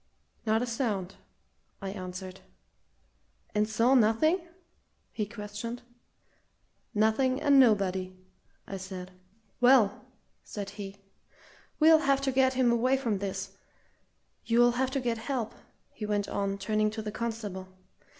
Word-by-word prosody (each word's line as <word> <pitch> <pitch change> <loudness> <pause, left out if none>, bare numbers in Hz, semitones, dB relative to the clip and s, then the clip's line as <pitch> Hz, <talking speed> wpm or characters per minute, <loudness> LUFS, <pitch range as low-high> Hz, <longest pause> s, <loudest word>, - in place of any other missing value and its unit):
"Not 220 +2 +2
a - - 0
sound!" 220 -6 -2 0.7
I 195 -1 -5
answered. 185 -1 -7 1.1
"And 210 +1 +1
saw 230 +4 +3
nothing?" 265 - +4 0.7
he 210 -2 -3
questioned. 225 +3 -6 1.1
"Nothing 240 +5 +2
and 280 -2 +5
nobody!" 190 -6 +2 0.5
I 195 - -6
said. 185 -1 -7 0.5
"Well," 245 -5 +4 0.4
said 200 -2 -6
he, 200 -1 -8 0.8
"we'll 320 0 +7
have 275 -2 +2
to 275 -1 0
get 260 0 +3
him 250 -2 +3
away 255 +3 +2
from 230 -7 -1
this. 195 0 -4 0.9
You'll 240 +1 +4
have 255 +2 0
to 275 +1 -1
get 235 -3 -1
help," 240 -2 -3 0.4
he 210 - -6
went 205 -1 0
on, 200 -1 -2
turning 215 +2 +1
to 220 +1 -6
the 210 - -4
constable. 215 -5 -4
220 Hz, 125 wpm, -29 LUFS, 200-250 Hz, 1.1 s, we'll